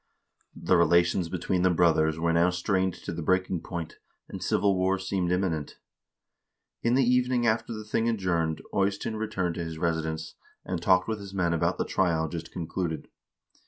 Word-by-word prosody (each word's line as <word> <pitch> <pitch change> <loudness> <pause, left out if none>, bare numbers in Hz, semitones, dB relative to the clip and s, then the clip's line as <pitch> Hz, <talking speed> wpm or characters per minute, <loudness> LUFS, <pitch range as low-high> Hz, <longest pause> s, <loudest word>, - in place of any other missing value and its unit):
The 95 - +1
relations 85 0 +3
between 90 +1 -1
the 90 - +4
brothers 80 -3 +3
were 85 0 +1
now 85 +2 +4
strained 95 +1 0
to - - -7
the - - -5
breaking 95 -2 +1
point, 85 -3 -6 0.3
and - - -8
civil 100 -1 +2
war 95 +1 +1
seemed 95 -2 -1
imminent. 90 -5 -1 1.0
In 120 +1 +2
the 135 - +4
evening 125 -1 +2
after 115 +1 +1
the 110 -1 -6
thing 115 +2 0
adjourned 85 -7 -1
Eystein 100 +2 0
returned 105 -5 -2
to 85 - -2
his 80 -1 -6
residence, 80 -1 -2 0.3
and 90 -2 -3
talked 90 +1 +3
with 110 -1 -2
his 100 -1 -9
men 85 -3 +1
about 85 - 0
the - - -1
trial 85 -4 +1
just 80 -1 -6
concluded. 85 -1 -4
90 Hz, 170 wpm, -27 LUFS, 85-100 Hz, 1.0 s, the